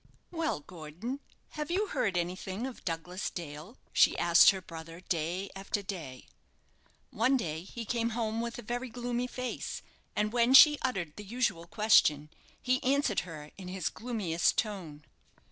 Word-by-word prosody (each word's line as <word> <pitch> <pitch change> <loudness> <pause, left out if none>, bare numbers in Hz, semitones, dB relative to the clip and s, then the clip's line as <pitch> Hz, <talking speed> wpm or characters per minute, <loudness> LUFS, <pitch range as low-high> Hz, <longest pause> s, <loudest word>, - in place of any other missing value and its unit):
"Well, 325 - -1
Gordon, 175 - -7 0.3
have 300 0 -5
you 385 +5 +1
heard 190 -4 0
anything 185 +5 -3
of 265 -2 -7
Douglas 175 +2 -3
Dale?" 165 - -8 0.2
she - - +5
asked 170 0 +7
her 190 - +2
brother, 165 -2 -9
day 180 +3 -2
after 195 +1 -3
day. 165 -10 -7 0.9
One 255 +5 +3
day 160 -8 -3
he 230 +6 -7
came 230 0 0
home 225 -1 -1
with 235 0 -4
a 240 - -7
very 245 +3 -3
gloomy 245 +1 -2
face, 255 0 -5 0.3
and 210 +1 0
when 245 +2 +4
she 295 +1 +9
uttered 180 -12 -2
the 210 - -7
usual 205 -6 -1
question, 155 -9 +4 0.3
he 255 0 +1
answered 270 -6 +2
her 150 -2 -9
in 185 - -8
his 185 -2 -2
gloomiest 210 -8 0
tone. 180 -9 -3
200 Hz, 155 wpm, -31 LUFS, 170-245 Hz, 0.9 s, she